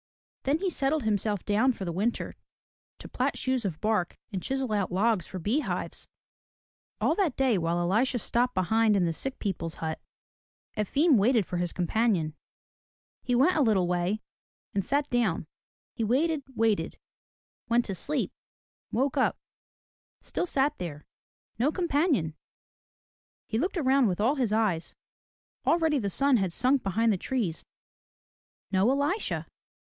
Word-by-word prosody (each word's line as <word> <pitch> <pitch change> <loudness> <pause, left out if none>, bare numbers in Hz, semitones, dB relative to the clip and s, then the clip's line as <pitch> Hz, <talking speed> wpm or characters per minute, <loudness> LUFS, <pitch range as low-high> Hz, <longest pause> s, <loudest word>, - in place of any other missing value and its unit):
Then 280 +3 +2
he 375 +2 -1
settled 290 0 0
himself 210 -2 0
down 220 +6 +3
for 195 - -6
the 170 - -2
winter 205 +7 -1 0.6
to - - -10
plat - - -1
shoes 260 -2 0
of 175 -6 -3
bark 210 -5 0
and 190 -3 -3
chisel 265 0 -2
out 200 -3 0
logs 200 0 +1
for 190 - -6
bee 210 - 0
hives. - - -4 0.9
All - - +2
that 370 -10 0
day 255 -7 +3
while 165 +1 0
Elisha 215 +9 +1
stopped 245 +2 0
behind 220 +3 +3
in 185 -3 +3
the 165 - 0
sick 270 +10 -2
people's 165 -5 -3
hut, 160 -1 -4 0.7
Efim 275 - +3
waited 220 0 +3
for 180 - -4
his 175 -1 -1
companion. 180 -3 +1 0.9
He 245 - 0
went 280 +9 +4
a 310 - +3
little 210 -8 +3
way 180 +4 -1 0.5
and 195 - 0
sat 285 +5 0
down. 225 -10 +1 0.5
He 230 - -2
waited, 290 +7 +1
waited, 225 -2 +1 0.4
— - - -49
went 235 +1 +3
to 195 - -3
sleep, 280 - -1 0.6
woke 270 +4 0
up, 260 - +2 0.5
— - - -73
still 360 - -2
sat 285 -1 +1
there, 155 -4 -6 0.3
— - - -50
no 270 +6 +3
companion! 300 - +1 1.1
He 220 - -2
looked 365 +6 -1
around 270 -4 +3
with 180 -1 -1
all 230 +6 +3
his 255 -7 0
eyes. 210 -7 0 0.7
Already 320 -3 +3
the 200 -4 -1
sun 275 +6 +3
had 190 -4 0
sunk 255 +8 +3
behind 220 +4 +2
the - - -1
trees. 215 -11 -2 1.1
No 195 +4 +3
Elisha! 285 +10 0
225 Hz, 155 wpm, -28 LUFS, 190-270 Hz, 1.1 s, went